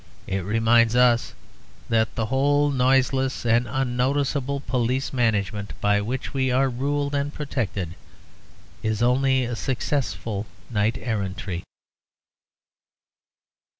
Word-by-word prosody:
It 95 - -2
reminds 115 +3 +3
us 125 -1 +3 0.5
that 110 -1 +1
the 115 - 0
whole 145 +4 +2
noiseless 130 0 +2
and 120 +1 +3
unnoticeable 135 +2 0
police 125 +2 -1
management 105 -4 -1
by 105 0 +2
which 125 +8 -4
we 130 -1 +1
are 130 +2 +2
ruled 140 +3 -1
and 140 0 0
protected 110 - -3 0.9
is 110 +1 0
only 130 +1 +3
a 120 0 -3
successful 115 -5 -2 0.2
knight 110 0 +1
errantry. 100 -5 -3
125 Hz, 105 wpm, -24 LUFS, 110-135 Hz, 0.9 s, reminds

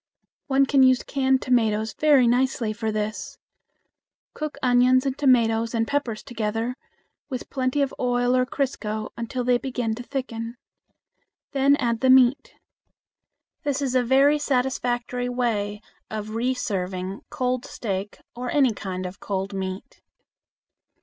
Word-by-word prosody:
One 275 0 +3
can 275 0 +3
use 255 -1 +5
canned 265 -1 +1
tomatoes 220 -3 +1
very 290 -5 +4
nicely 245 -2 +1
for 220 0 -2
this. 215 0 -4 1.0
Cook 305 -2 -5
onions 250 +1 +4
and 270 -1 0
tomatoes 230 -4 +2
and 225 0 +1
peppers 255 -7 -2
together, 225 +1 -2 0.6
with 255 -3 -6
plenty 265 +1 0
of 275 - -3
oil 245 0 +1
or 255 0 +2
crisco 220 -5 -3
until 235 +2 -3
they 245 0 +3
begin 245 -4 -2
to 230 - -6
thicken. 240 -3 -5 0.9
Then 275 +1 +4
add 235 -5 -1
the 260 - +2
meat. 260 - +4 1.1
This 285 -2 -1
is 265 -3 -1
also 255 - +4
a - - -6
very 280 +3 +4
satisfactory 250 -2 -1
way 215 -4 -1 0.3
of 215 0 -5
reserving 195 -6 -2
cold 255 -4 -1
steak 200 -2 -4 0.2
or 250 +1 -4
any 265 -5 +3
kind 185 -3 -5
of 180 +2 -7
cold 195 0 -3
meat. 190 0 -6
245 Hz, 135 wpm, -24 LUFS, 220-265 Hz, 1.1 s, use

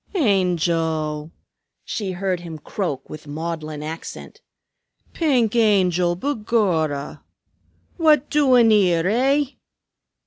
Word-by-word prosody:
"Angel!" 165 - 0 0.5
she 195 -4 -3
heard 185 0 -2
him 170 -2 -8
croak 150 -4 -4
with 155 -1 -10
maudlin 155 0 -5
accent. 160 +2 -8 0.7
"Pink 250 -9 +1
Angel, 180 -6 +3
begorrah! 190 - -1 0.8
What 305 -4 +4
doin' 255 -6 +5
'ere, 180 -5 +3
eh? 270 +7 +2
180 Hz, 90 wpm, -22 LUFS, 160-230 Hz, 0.8 s, doin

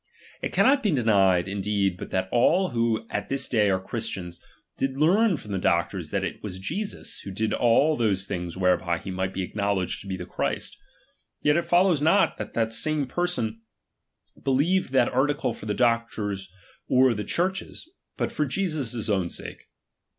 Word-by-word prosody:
It - - -3
cannot 275 +1 +4
be 215 - +1
denied, 100 - +3
iibtiiBfo 95 - -6
indeed, 100 -1 0
but - - -7
that 95 0 -1
all 175 +10 +3
who 115 -1 0
at - - -3
this 135 -1 -1
day 105 -4 +2
are 95 -1 +2
Christians, 95 -4 -4
''"'"" - - -26
°" - - -28 0.3
did 135 0 -2
learn 185 +5 +4
from 105 - -10
the 95 - -1
doctors 85 -1 0
that 95 +2 -1
it 95 - -4
was 95 -3 -6
Jesus, 200 - -4
who - - -8
did 110 +3 -1
all 130 +6 +3
those 100 -7 +1
things 90 -3 -4
whereby 90 -2 +2
he 95 - -7
might 95 0 -2
be 95 -1 -3
aclinow 100 -1 0
ledged 90 -1 -2
to 100 - -11
be 95 -1 -3
the 90 - -6
Christ. - - -3 0.7
Yet 150 0 +4
it 170 - +1
follows 175 -3 +3
not, 165 +7 +3
that 105 - -7
the 115 -1 +1
same 150 +5 0
persons 125 -7 -2 0.9
believed 145 +5 +2
that 130 -2 +3
article 135 -1 +1
for 110 - -10
the 105 - -1
doc 115 +1 +2
tor's 100 -3 -4 0.4
or 130 -1 +4
the 105 -1 -3
Church's, 190 - -2 0.3
but - - -1
for 150 - -1
Jesus' 135 - -2
own 95 -5 +1
sake. - - -8
115 Hz, 190 wpm, -26 LUFS, 95-145 Hz, 0.9 s, cannot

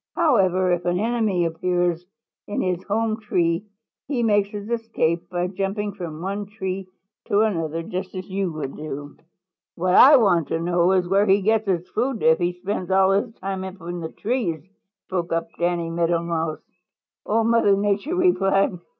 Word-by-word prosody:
"However, 190 - +3
if 175 0 0
an 175 0 +1
enemy 215 -5 +1
appears 175 +1 -1 0.4
in 205 - -3
his 180 -1 -1
home 220 +1 0
tree, 175 -3 0 0.4
he 260 -4 -1
makes 205 -3 +2
his 205 0 -7
escape 220 -8 -1
by 175 -1 -1
jumping 195 +2 -3
from 165 -3 -7
one 200 +1 -3
tree 190 -2 -5 0.4
to 205 +1 +3
another, 165 -6 -1
just 185 +3 -5
as 185 0 -6
you 190 -2 -2
would 155 -4 -5
do." 145 -1 -7 0.6
"What 180 +1 0
I 280 +9 +9
want 175 - +3
to 165 - -1
know 175 +2 +2
is 180 -2 +2
where 200 +3 +3
he 195 +1 +4
gets 220 +1 +2
his 180 -2 0
food 240 +1 -2
if 160 0 +5
he 175 0 0
spends 185 +1 -4
all 190 0 +4
his 205 +4 +1
time 190 0 -4
up 190 +1 -8
in 175 +1 -5
the 160 -1 -6
trees," 205 - -2 0.4
spoke 175 -2 -3
up 165 0 -1
Danny 170 -1 0
Meadow 170 0 +1
Mouse. 165 -2 -3 0.6
Old 225 +1 +1
Mother 230 -4 +4
Nature 205 - 0 0.2
smiled. 195 -2 +2
185 Hz, 175 wpm, -23 LUFS, 170-205 Hz, 0.6 s, I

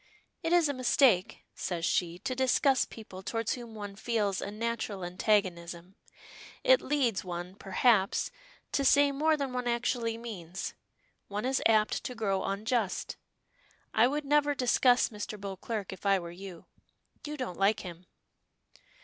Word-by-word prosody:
"It 330 -1 -1
is 345 -3 +5
a 285 - -1
mistake," 255 -6 +3
says 170 -2 -3
she, 175 -2 0
"to 255 - -3
discuss 260 +1 +3
people 200 -4 -10
towards 225 +3 -1
whom 235 -3 -8
one 205 -2 -7
feels 210 -3 -1
a - - -4
natural 215 -3 -3
antagonism. 180 -2 -1 0.7
It - - +6
leads, 260 -8 0
one, 175 0 -5
perhaps, 195 +1 +2 0.4
to 280 - +1
say 285 +1 +5
more 310 +3 +2
than 275 -3 -3
one 250 -1 -2
actually 235 -1 0
means. 190 -6 -6 0.5
One 205 +3 -3
is 265 +1 +1
apt 215 -1 +2
to 250 - -4
grow 195 -4 0
unjust. 215 +1 -1 0.8
I 230 - +5
would 290 +2 -2
never 290 0 +3
discuss 250 -1 +4
Mr. 210 -1 -6
Beauclerk 200 +1 -5
if 190 - -12
I 200 -1 +4
were 170 -2 -6
you. 180 -1 -10 0.6
You 300 0 -5
don't 240 -10 -5
like 205 +2 +3
him." 180 0 -9
220 Hz, 150 wpm, -30 LUFS, 190-255 Hz, 0.8 s, It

